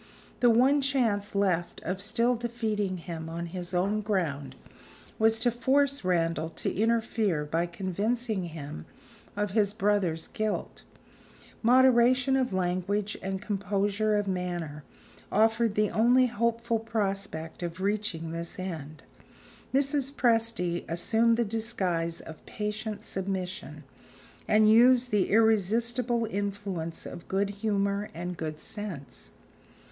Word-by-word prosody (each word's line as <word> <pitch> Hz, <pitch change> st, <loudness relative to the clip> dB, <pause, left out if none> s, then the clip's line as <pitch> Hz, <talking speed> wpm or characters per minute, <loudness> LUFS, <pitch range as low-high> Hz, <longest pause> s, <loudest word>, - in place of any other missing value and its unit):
The 245 Hz, -, +5 dB
one 260 Hz, +5 st, +4 dB
chance 225 Hz, -7 st, 0 dB
left 180 Hz, -4 st, 0 dB
of 185 Hz, +3 st, -3 dB
still 235 Hz, +4 st, +2 dB
defeating 220 Hz, -5 st, -2 dB
him 165 Hz, -2 st, -6 dB
on 170 Hz, +1 st, -4 dB
his 175 Hz, +1 st, -5 dB
own 195 Hz, +4 st, +1 dB
ground 170 Hz, -10 st, -2 dB, 0.6 s
was 225 Hz, 0 st, +4 dB
to 240 Hz, -, +3 dB
force 275 Hz, +3 st, +2 dB
Randal 165 Hz, -3 st, 0 dB
to -, -, -3 dB
interfere 220 Hz, -6 st, +1 dB
by 165 Hz, +3 st, 0 dB
convincing 200 Hz, +4 st, -2 dB
him 145 Hz, -, -8 dB, 0.5 s
of 205 Hz, -1 st, -1 dB
his 205 Hz, -1 st, +1 dB
brother's 200 Hz, -6 st, +1 dB
guilt. 215 Hz, -1 st, -3 dB, 0.8 s
Moderation 255 Hz, +2 st, +5 dB
of 260 Hz, -1 st, +1 dB
language 190 Hz, +3 st, -1 dB
and 190 Hz, 0 st, -3 dB
composure 205 Hz, +1 st, 0 dB
of 205 Hz, -1 st, -1 dB
manner 175 Hz, -5 st, -3 dB, 0.5 s
offered 225 Hz, 0 st, +3 dB
the 210 Hz, -1 st, +2 dB
only 245 Hz, +3 st, +4 dB
hopeful 235 Hz, 0 st, 0 dB
prospect 195 Hz, -8 st, -3 dB
of 170 Hz, 0 st, -5 dB
reaching 195 Hz, -5 st, -2 dB
this 170 Hz, +1 st, -5 dB
end. 155 Hz, -5 st, -6 dB, 0.7 s
Mrs. 275 Hz, 0 st, +1 dB
Presty 225 Hz, -9 st, +1 dB
assumed 225 Hz, +7 st, +2 dB
the 235 Hz, -, +2 dB
disguise 190 Hz, -7 st, -1 dB
of 160 Hz, -, -11 dB
patient 210 Hz, 0 st, -4 dB
submission, 190 Hz, 0 st, -4 dB, 0.6 s
and 215 Hz, 0 st, +5 dB
used 245 Hz, +3 st, +5 dB
the 205 Hz, -3 st, +2 dB
irresistible 225 Hz, +3 st, +2 dB
influence 200 Hz, -5 st, -4 dB
of 170 Hz, -, -9 dB
good 200 Hz, +1 st, 0 dB
humor 200 Hz, -1 st, 0 dB
and 175 Hz, +2 st, -4 dB
good 155 Hz, -2 st, -5 dB
sense. 195 Hz, -10 st, -7 dB
205 Hz, 120 wpm, -28 LUFS, 180-230 Hz, 0.8 s, The